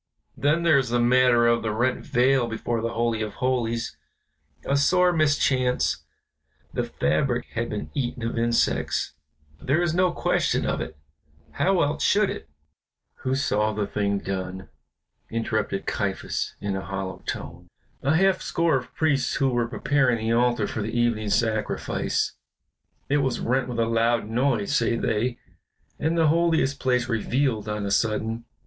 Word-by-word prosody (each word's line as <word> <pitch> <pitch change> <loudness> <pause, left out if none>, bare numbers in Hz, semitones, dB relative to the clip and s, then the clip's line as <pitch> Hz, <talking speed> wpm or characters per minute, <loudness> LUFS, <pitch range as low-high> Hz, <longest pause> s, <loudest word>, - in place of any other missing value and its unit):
Then 150 +4 +1
there 155 -4 +5
is 130 -3 -2
the 120 +1 +1
matter 120 0 +4
of 120 0 +3
the 110 - -1
rent 120 +4 0
veil 125 0 +2
before 115 0 -2
the 115 +1 -2
Holy 115 -1 0
of 105 -1 -4
Holies; 120 -3 -1 0.7
a 140 - +1
sore 180 +5 +4
mischance, 140 -5 +1 0.7
the - - -1
fabric 120 - 0
had 115 +1 -2
been 105 - -5
eaten 125 -4 -3
of 115 - -2
insects, 115 0 0 0.5
there 140 +5 +1
is 175 -2 +1
no 180 0 +3
question - - 0
of - - -1
it, 80 - -6 0.5
how 190 -2 +2
else 145 +1 -1
should 205 -1 +3
it 80 - -8 0.4
" - - -57
"Who 130 +1 0
saw 110 -5 +1
the 105 -1 -1
thing 100 0 -1
done?" 95 -1 -5 0.6
interrupted 110 -3 -2
Caiaphas 100 -2 -2
in 100 -1 -2
a 95 - -3
hollow 95 -2 -5
tone. 85 +3 -6 0.3
"A 140 +3 +2
half 190 +2 +3
score 165 -4 +1
of 125 - -8
priests 140 -4 +1
who 135 - +2
were 120 -2 0
preparing 130 0 +1
the 110 +1 -1
altar 120 -2 +2
for 110 - -4
the 110 +3 -3
evening 115 -3 +1
sacrifice. 110 0 0 0.7
It 145 - +2
was 130 -4 0
rent 130 +1 0
with 120 -2 -5
a 115 - +2
loud 115 -1 +1
noise, 120 -2 0
say 115 0 +2
they, 115 +2 -1 0.6
and 160 +2 0
the 160 -2 +4
Holiest 160 -4 +2
place 125 -1 +1
revealed 115 -1 0
on 105 -1 -2
a 100 - -2
sudden. 115 +2 0
120 Hz, 160 wpm, -25 LUFS, 110-135 Hz, 0.7 s, there